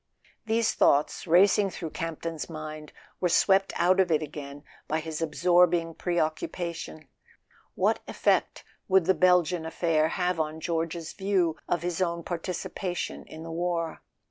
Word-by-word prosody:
These 225 Hz, 0 st, +2 dB
thoughts, 145 Hz, +5 st, +2 dB
racing 195 Hz, +4 st, +5 dB
through 165 Hz, -3 st, -6 dB
Campton's 165 Hz, -1 st, -5 dB
mind, 155 Hz, -1 st, -7 dB, 0.3 s
were 180 Hz, -, +1 dB
swept 195 Hz, +3 st, +3 dB
out 185 Hz, +2 st, +3 dB
of 185 Hz, -2 st, +4 dB
it 155 Hz, -1 st, +2 dB
again 145 Hz, -1 st, -8 dB, 0.2 s
by 155 Hz, -, 0 dB
his 160 Hz, 0 st, -5 dB
absorbing 170 Hz, +1 st, +3 dB
preoccupa¬ 170 Hz, +1 st, -2 dB
tion. 155 Hz, -2 st, -9 dB, 0.7 s
What -, -, +2 dB
effect -, -, 0 dB, 0.2 s
would 190 Hz, -2 st, +4 dB
the 190 Hz, -, +4 dB
Belgian 180 Hz, -1 st, +3 dB
affair 160 Hz, -1 st, +1 dB
have 180 Hz, 0 st, -1 dB
on 155 Hz, 0 st, -2 dB
George's 165 Hz, 0 st, -3 dB
view 190 Hz, -5 st, +1 dB
of 175 Hz, -, 0 dB
his 175 Hz, 0 st, -2 dB
own 170 Hz, -2 st, -1 dB
participation 180 Hz, +1 st, -4 dB
in 160 Hz, +1 st, -10 dB
the 165 Hz, -, -7 dB
war? 170 Hz, -1 st, -2 dB
170 Hz, 145 wpm, -27 LUFS, 160-180 Hz, 0.7 s, racing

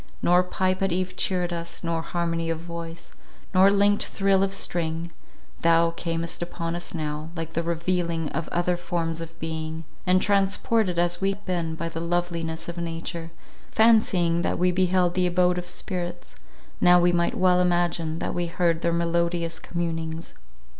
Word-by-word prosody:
Nor 180 Hz, +1 st, +5 dB
pipe 185 Hz, +1 st, -1 dB
at 195 Hz, -1 st, +1 dB
eve 185 Hz, +1 st, -1 dB
cheered 180 Hz, -2 st, 0 dB
us, 170 Hz, +1 st, -5 dB
nor 165 Hz, -1 st, -1 dB
harmony 165 Hz, -1 st, -2 dB
of 165 Hz, -, 0 dB
voice, 170 Hz, 0 st, -8 dB, 0.4 s
nor 190 Hz, +1 st, +7 dB
linked 205 Hz, +1 st, +3 dB
thrill 195 Hz, -1 st, +2 dB
of 195 Hz, 0 st, +1 dB
string; 170 Hz, -3 st, -1 dB, 0.5 s
thou 165 Hz, 0 st, +4 dB
camest 165 Hz, 0 st, -3 dB
upon 170 Hz, -1 st, -3 dB
us 175 Hz, 0 st, -5 dB
now, 155 Hz, 0 st, -3 dB
like 165 Hz, -1 st, -5 dB
the 165 Hz, -, 0 dB
revealing 170 Hz, -1 st, -1 dB
of 165 Hz, +2 st, -3 dB
other 175 Hz, +1 st, +1 dB
forms 165 Hz, -2 st, -2 dB
of 165 Hz, 0 st, -9 dB
being; 160 Hz, 0 st, -4 dB, 0.2 s
and 185 Hz, 0 st, +5 dB
transported 195 Hz, 0 st, +2 dB
as 175 Hz, +1 st, +1 dB
we 195 Hz, -, +2 dB
had 205 Hz, +1 st, -15 dB
been 170 Hz, -3 st, -1 dB
by 165 Hz, +1 st, -3 dB
the 165 Hz, 0 st, -5 dB
loveliness 170 Hz, -1 st, -2 dB
of 170 Hz, 0 st, -5 dB
nature, 165 Hz, 0 st, -4 dB, 0.4 s
fancying 195 Hz, -7 st, +4 dB
that -, -, 0 dB
we 180 Hz, +1 st, +3 dB
beheld 180 Hz, -1 st, +2 dB
the 180 Hz, 0 st, +2 dB
abode 180 Hz, 0 st, +2 dB
of 175 Hz, 0 st, -7 dB
spirits, 175 Hz, -2 st, -4 dB, 0.5 s
now 180 Hz, 0 st, +7 dB
we 175 Hz, 0 st, +4 dB
might 170 Hz, 0 st, +1 dB
well 180 Hz, -1 st, +4 dB
imagine 175 Hz, -2 st, +1 dB
that -, -, -3 dB
we 175 Hz, -1 st, -1 dB
heard 170 Hz, -1 st, +1 dB
their 170 Hz, -, +1 dB
melodious 170 Hz, 0 st, 0 dB
communings. 165 Hz, -1 st, -4 dB
170 Hz, 165 wpm, -25 LUFS, 165-180 Hz, 0.5 s, nor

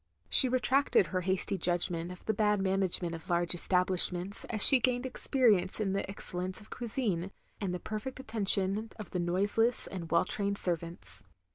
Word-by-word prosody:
She 260 Hz, -, +3 dB
retracted 255 Hz, -3 st, +2 dB
her 185 Hz, +1 st, -3 dB
hasty 190 Hz, +1 st, -2 dB
judgment 175 Hz, 0 st, -1 dB
of 180 Hz, -, -13 dB
the 220 Hz, -, 0 dB
bad 210 Hz, 0 st, +1 dB
management 190 Hz, -3 st, -1 dB
of 165 Hz, -1 st, -9 dB
large 175 Hz, 0 st, +2 dB
establishments, 180 Hz, +1 st, +1 dB
as 215 Hz, -3 st, +7 dB
she 270 Hz, -, +9 dB
gained 245 Hz, +1 st, +1 dB
experience 230 Hz, -8 st, +1 dB
in 195 Hz, -3 st, -1 dB
the 195 Hz, 0 st, -3 dB
excellence 185 Hz, -1 st, -2 dB
of 215 Hz, -, -17 dB
cuisine, 215 Hz, -7 st, -3 dB, 0.3 s
and 195 Hz, -3 st, -3 dB
the 180 Hz, -, -4 dB
perfect 215 Hz, +7 st, -6 dB
attention 210 Hz, -2 st, 0 dB
of 215 Hz, -, -9 dB
the 180 Hz, -, -3 dB
noiseless 205 Hz, +7 st, +1 dB
and 170 Hz, -4 st, -6 dB
well 170 Hz, +2 st, +2 dB
trained 200 Hz, +1 st, -1 dB
servants. 170 Hz, -, -4 dB
195 Hz, 165 wpm, -30 LUFS, 180-220 Hz, 0.3 s, she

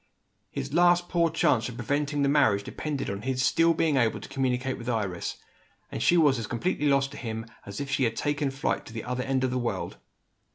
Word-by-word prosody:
His 140 Hz, -, -5 dB
last 175 Hz, +1 st, +4 dB
poor 170 Hz, -2 st, +2 dB
chance 150 Hz, -8 st, +2 dB
of 125 Hz, -, -8 dB
preventing 145 Hz, +4 st, -1 dB
the -, -, +3 dB
marriage 140 Hz, -9 st, +3 dB
depended 145 Hz, +5 st, -4 dB
on 100 Hz, 0 st, -4 dB
his 130 Hz, +2 st, -2 dB
being 165 Hz, 0 st, +4 dB
still 150 Hz, -4 st, +2 dB
able 115 Hz, -2 st, +1 dB
to -, -, -10 dB
communicate 130 Hz, 0 st, -1 dB
with 120 Hz, +1 st, -5 dB
Iris 100 Hz, -7 st, -2 dB, 0.5 s
and -, -, -4 dB
she 175 Hz, -, +4 dB
was 145 Hz, -6 st, +4 dB
as 110 Hz, -, -4 dB
completely 150 Hz, +4 st, -1 dB
lost 140 Hz, -1 st, +2 dB
to 145 Hz, -, -9 dB
him 115 Hz, -2 st, -5 dB, 0.2 s
as 100 Hz, 0 st, -6 dB
if 140 Hz, -1 st, -4 dB
she 140 Hz, -2 st, +2 dB
had 115 Hz, -1 st, -1 dB
taken 145 Hz, +2 st, 0 dB
flight 135 Hz, 0 st, -2 dB
to -, -, -10 dB
the 115 Hz, -, -5 dB
other 125 Hz, 0 st, -3 dB
end 130 Hz, 0 st, 0 dB
of 130 Hz, -, +1 dB
the 130 Hz, -, 0 dB
world. 120 Hz, -1 st, -3 dB
135 Hz, 220 wpm, -27 LUFS, 120-145 Hz, 0.5 s, last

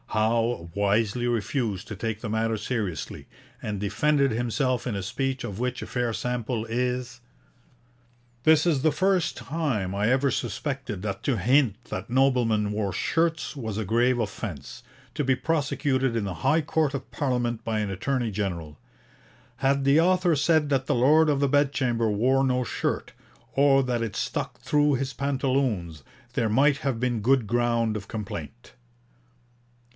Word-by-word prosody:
Howe 110 Hz, -4 st, 0 dB
wisely 105 Hz, +4 st, +1 dB
refused 115 Hz, -3 st, -1 dB
to 105 Hz, -, -6 dB
take 110 Hz, +2 st, -3 dB
the 110 Hz, -, -5 dB
matter 110 Hz, +1 st, 0 dB
seriously, 100 Hz, -, -4 dB, 0.3 s
and 105 Hz, -2 st, -3 dB
defended 140 Hz, +7 st, +2 dB
himself 120 Hz, +2 st, 0 dB
in 115 Hz, -, -2 dB
a 100 Hz, -, -3 dB
speech 135 Hz, +6 st, -2 dB
of 100 Hz, +1 st, -6 dB
which 125 Hz, 0 st, -2 dB
a -, -, -6 dB
fair 120 Hz, -2 st, -1 dB
sample 120 Hz, -1 st, -2 dB
is: 125 Hz, +1 st, -2 dB, 1.2 s
'This 160 Hz, 0 st, +5 dB
is 155 Hz, -6 st, +2 dB
the 155 Hz, +2 st, +3 dB
first 185 Hz, +2 st, +1 dB
time 120 Hz, -, -2 dB
I 105 Hz, +3 st, +1 dB
ever 135 Hz, +2 st, +3 dB
suspected 125 Hz, -4 st, -3 dB
that 100 Hz, -2 st, -4 dB
to 130 Hz, -5 st, +1 dB
hint 125 Hz, +1 st, +2 dB
that 105 Hz, +2 st, -6 dB
noblemen 120 Hz, -5 st, +2 dB
wore 105 Hz, -2 st, -1 dB
shirts 165 Hz, -, 0 dB
was 110 Hz, -7 st, -4 dB
a 110 Hz, -, -2 dB
grave 120 Hz, +4 st, +2 dB
offence, 105 Hz, -, -5 dB, 0.3 s
to 150 Hz, -, -1 dB
be 130 Hz, -1 st, +2 dB
prosecuted 140 Hz, -4 st, 0 dB
in 105 Hz, -, -1 dB
the 95 Hz, -, -3 dB
High 160 Hz, +1 st, +4 dB
Court 155 Hz, -1 st, 0 dB
of 140 Hz, -, -6 dB
Parliament 125 Hz, -5 st, -1 dB
by 110 Hz, -1 st, -1 dB
an 105 Hz, -2 st, -2 dB
Attorney 120 Hz, +4 st, -1 dB
General. 85 Hz, -7 st, -4 dB, 0.8 s
Had 135 Hz, 0 st, +1 dB
the 140 Hz, +3 st, +5 dB
author 180 Hz, -1 st, +3 dB
said 150 Hz, +1 st, +3 dB
that 135 Hz, -2 st, 0 dB
the -, -, +2 dB
Lord 150 Hz, +6 st, +5 dB
of 145 Hz, -2 st, +2 dB
the 140 Hz, -, +2 dB
Bedchamber 130 Hz, -5 st, +1 dB
wore 130 Hz, +6 st, +2 dB
no 125 Hz, -1 st, +1 dB
shirt, -, -, -3 dB, 0.4 s
or 135 Hz, 0 st, +5 dB
that 125 Hz, -2 st, -1 dB
it 110 Hz, -3 st, -3 dB
stuck -, -, -3 dB
through 150 Hz, -1 st, +2 dB
his 135 Hz, +1 st, -3 dB
pantaloons, 130 Hz, -, -1 dB, 0.3 s
there 115 Hz, -4 st, 0 dB
might 140 Hz, +6 st, +4 dB
have 135 Hz, -6 st, -2 dB
been 120 Hz, -2 st, 0 dB
good 130 Hz, +1 st, +3 dB
ground 115 Hz, -1 st, +1 dB
of 100 Hz, -2 st, -5 dB
complaint.' 105 Hz, 0 st, -7 dB
125 Hz, 160 wpm, -26 LUFS, 110-140 Hz, 1.2 s, This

